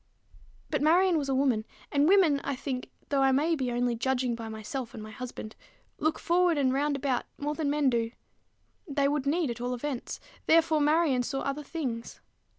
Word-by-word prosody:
But 295 Hz, -3 st, 0 dB
Marion 350 Hz, +4 st, +4 dB
was 280 Hz, -2 st, -3 dB
a 265 Hz, -, +1 dB
woman; 260 Hz, -5 st, +2 dB, 0.3 s
and 285 Hz, +1 st, +3 dB
women, 345 Hz, -8 st, +5 dB
I 280 Hz, -, -2 dB
think, 255 Hz, -1 st, -4 dB, 0.2 s
though 280 Hz, -1 st, +2 dB
I 270 Hz, 0 st, +5 dB
may 300 Hz, +5 st, +2 dB
be 260 Hz, -4 st, -2 dB
only 245 Hz, 0 st, +1 dB
judging 250 Hz, +1 st, 0 dB
by 230 Hz, -1 st, -6 dB
myself 220 Hz, +3 st, -5 dB
and 220 Hz, -, -7 dB
my 215 Hz, -, -9 dB
husband, 235 Hz, -2 st, -7 dB, 0.4 s
look 315 Hz, +1 st, +1 dB
forward 345 Hz, -1 st, +2 dB
and 260 Hz, -2 st, +2 dB
round 285 Hz, +1 st, +1 dB
about, 270 Hz, -2 st, -1 dB
more 295 Hz, +1 st, -2 dB
than 300 Hz, -2 st, -1 dB
men 290 Hz, -1 st, +2 dB
do: 230 Hz, -1 st, 0 dB, 0.8 s
they 280 Hz, -2 st, +1 dB
would 285 Hz, -1 st, -1 dB
need 310 Hz, -2 st, +1 dB
at 235 Hz, 0 st, -7 dB
all 250 Hz, +1 st, -1 dB
events; 260 Hz, 0 st, -4 dB, 0.3 s
therefore 320 Hz, -1 st, +4 dB
Marion 300 Hz, -3 st, +3 dB
saw 270 Hz, +2 st, -2 dB
other 275 Hz, +2 st, -2 dB
things. 265 Hz, -7 st, -5 dB
275 Hz, 190 wpm, -29 LUFS, 245-300 Hz, 0.8 s, women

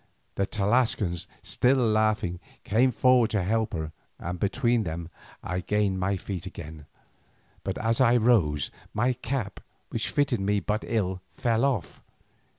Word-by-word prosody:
The 100 Hz, -, 0 dB
Tlascalan, 105 Hz, -4 st, +1 dB, 0.2 s
still 130 Hz, +2 st, +2 dB
laughing, 110 Hz, -6 st, +1 dB, 0.2 s
came 120 Hz, +5 st, +3 dB
forward 125 Hz, -1 st, +4 dB
to 105 Hz, -4 st, 0 dB
help 110 Hz, +3 st, 0 dB
her, 80 Hz, -3 st, -3 dB, 0.3 s
and 90 Hz, +1 st, -5 dB
between 120 Hz, +4 st, +1 dB
them 85 Hz, -3 st, -4 dB, 0.3 s
I 90 Hz, 0 st, -2 dB
gained 100 Hz, 0 st, 0 dB
my 95 Hz, +1 st, 0 dB
feet 95 Hz, 0 st, -5 dB
again, 80 Hz, -5 st, -9 dB, 0.8 s
but -, -, -3 dB
as 115 Hz, +3 st, +1 dB
I 120 Hz, -1 st, +5 dB
rose, 90 Hz, -, +2 dB, 0.2 s
my 120 Hz, +4 st, +2 dB
cap, 120 Hz, -4 st, -4 dB, 0.3 s
which -, -, -2 dB
fitted 140 Hz, -5 st, +1 dB
me 100 Hz, +1 st, +1 dB
but 105 Hz, +3 st, -2 dB
ill, 95 Hz, -5 st, -1 dB
fell 115 Hz, 0 st, +1 dB
off. 135 Hz, -5 st, -1 dB
105 Hz, 145 wpm, -27 LUFS, 90-120 Hz, 0.8 s, I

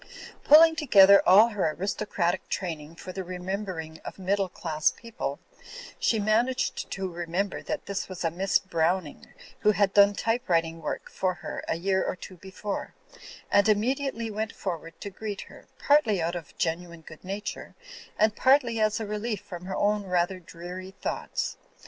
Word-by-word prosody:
Pulling 320 Hz, +2 st, +8 dB
together 200 Hz, -11 st, +7 dB
all 210 Hz, +5 st, +8 dB
her 205 Hz, -7 st, 0 dB
aris 195 Hz, +4 st, -2 dB
tocratic 185 Hz, -4 st, -1 dB
training 165 Hz, -4 st, -4 dB
for 185 Hz, -, -8 dB
the 190 Hz, +1 st, -5 dB
remembering 180 Hz, -3 st, -5 dB
of -, -, -8 dB
middle 195 Hz, 0 st, 0 dB
class 155 Hz, -3 st, 0 dB
people, 230 Hz, 0 st, -5 dB, 0.6 s
she 225 Hz, -, +2 dB
managed 225 Hz, +5 st, 0 dB
to 190 Hz, 0 st, -3 dB
remember 175 Hz, +3 st, -3 dB
that -, -, -4 dB
this 200 Hz, -1 st, -4 dB
was 185 Hz, -1 st, -6 dB
a 165 Hz, -, +1 dB
Miss 190 Hz, +3 st, +2 dB
Browning 170 Hz, -2 st, -1 dB, 0.3 s
who 210 Hz, -, +4 dB
had 200 Hz, 0 st, +2 dB
done 200 Hz, 0 st, +6 dB
typewriting 170 Hz, -9 st, 0 dB
work 150 Hz, -, -4 dB
for 185 Hz, -1 st, -1 dB
her -, -, -6 dB
a -, -, 0 dB
year 190 Hz, +2 st, +1 dB
or -, -, -2 dB
two 185 Hz, 0 st, -11 dB
before; 190 Hz, +3 st, -6 dB, 0.6 s
and 200 Hz, +1 st, +4 dB
immediately 230 Hz, +1 st, 0 dB
went 215 Hz, 0 st, -3 dB
forward 165 Hz, -3 st, -6 dB
to 200 Hz, -, -6 dB
greet 205 Hz, 0 st, -5 dB
her, -, -, -14 dB
partly 265 Hz, -9 st, +3 dB
out 165 Hz, +1 st, -1 dB
of 170 Hz, -4 st, -8 dB
genuine 170 Hz, 0 st, -2 dB
good 155 Hz, 0 st, -13 dB
nature 195 Hz, +3 st, -6 dB, 0.4 s
and 215 Hz, 0 st, +3 dB
partly 260 Hz, -4 st, +3 dB
as 215 Hz, +1 st, +2 dB
a 220 Hz, -, -3 dB
relief 210 Hz, 0 st, -3 dB
from 180 Hz, -3 st, -9 dB
her 190 Hz, -, -4 dB
own 205 Hz, 0 st, +1 dB
rather 180 Hz, 0 st, 0 dB
dreary 180 Hz, +2 st, -9 dB
thoughts. -, -, -3 dB
195 Hz, 165 wpm, -27 LUFS, 175-210 Hz, 0.6 s, Pulling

